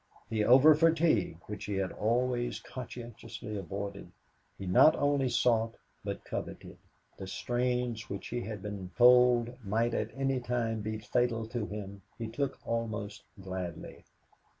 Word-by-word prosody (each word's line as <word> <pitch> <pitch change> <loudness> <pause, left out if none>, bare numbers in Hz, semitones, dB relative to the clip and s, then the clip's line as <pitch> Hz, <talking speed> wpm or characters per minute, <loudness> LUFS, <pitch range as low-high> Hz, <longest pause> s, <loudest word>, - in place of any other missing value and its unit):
The 110 -2 +1
over 135 +7 +8
fatigue 155 - +3
which 105 0 -6
he 105 - -2
had 95 -1 -1
always 120 +2 0
conscientiously 120 -3 -8
avoided 100 -1 -5 0.5
he 100 - -6
not 95 +12 +6
only 145 -2 +2
sought 115 -1 +2 0.3
but - - -5
coveted; - - -6 0.4
the 95 - -6
strains 120 +1 -1
which 100 0 -5
he 120 - -2
had 105 -3 -6
been 100 -3 -5
told 125 -1 +5
might 115 +4 +1
at - - -1
any 135 -1 0
time 120 -3 -1
be 110 +1 -3
fatal 115 +1 0
to 115 -3 -3
him, 100 -1 -7 0.2
he 115 - -4
took 135 +4 -2
almost 110 -3 -3 0.2
gladly. 95 -3 -6
115 Hz, 140 wpm, -31 LUFS, 105-125 Hz, 0.5 s, over